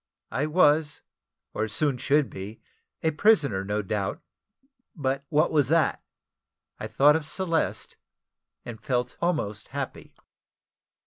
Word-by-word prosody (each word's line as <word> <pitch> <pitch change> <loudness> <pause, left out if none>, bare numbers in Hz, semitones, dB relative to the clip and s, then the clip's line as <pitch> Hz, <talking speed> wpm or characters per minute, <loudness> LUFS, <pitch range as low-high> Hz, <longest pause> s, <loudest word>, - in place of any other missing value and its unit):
I 145 +4 -1
was, 150 -2 +3 0.5
or 110 +1 -1
soon 130 +4 0
should 140 +2 +2
be, 100 +4 -8 0.4
a 160 - +2
prisoner, 150 - +3
no 105 +1 -2
doubt; 105 - -2 0.8
but 135 -3 -2
what 155 +3 +2
was 150 -3 +3
that? 160 +1 +2 0.8
I - - -4
thought 145 +2 +5
of 160 - -1
Celeste, 165 +1 -2 0.7
and 115 -2 -8
felt 125 -1 -1
almost 150 - -1
happy. - - -6
145 Hz, 120 wpm, -26 LUFS, 110-155 Hz, 0.8 s, thought